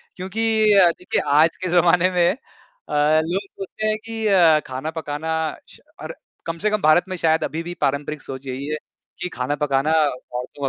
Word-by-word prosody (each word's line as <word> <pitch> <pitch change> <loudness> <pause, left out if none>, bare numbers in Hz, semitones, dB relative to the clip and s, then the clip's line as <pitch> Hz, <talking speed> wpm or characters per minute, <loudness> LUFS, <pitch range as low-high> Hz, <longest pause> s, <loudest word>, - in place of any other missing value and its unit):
क्योंकि 190 +5 -4 0.4
अ, 180 -2 +7
देखिए 180 - -1 0.2
आज 165 +1 +2
के 185 - -1
ज़माने 175 +1 +4
में 175 -1 +3
अ, - - -13 0.9
लोग 180 +4 -1
सोचते 195 +3 -5
हैं 215 0 0
कि 225 -1 -4
अ, 170 -6 +5
खाना 130 +5 -5
पकाना 155 +1 -4 0.4
श - - -16 0.2
और - - -6 0.3
कम 165 0 -4
से - - +4
कम 210 -1 0
भारत 155 +3 +4
में 185 - -3
शायद 160 -1 +2
अभी 165 +2 -3
भी 175 +1 -6
पारंपरिक 145 +1 -1
सोच 135 0 -9
यही 130 +2 -5
है 155 0 -2 0.4
कि 180 - -2
खाना 130 +3 -1
पकाना 135 +2 +1
औरतों 125 -1 -4
160 Hz, 185 wpm, -21 LUFS, 145-180 Hz, 0.9 s, अ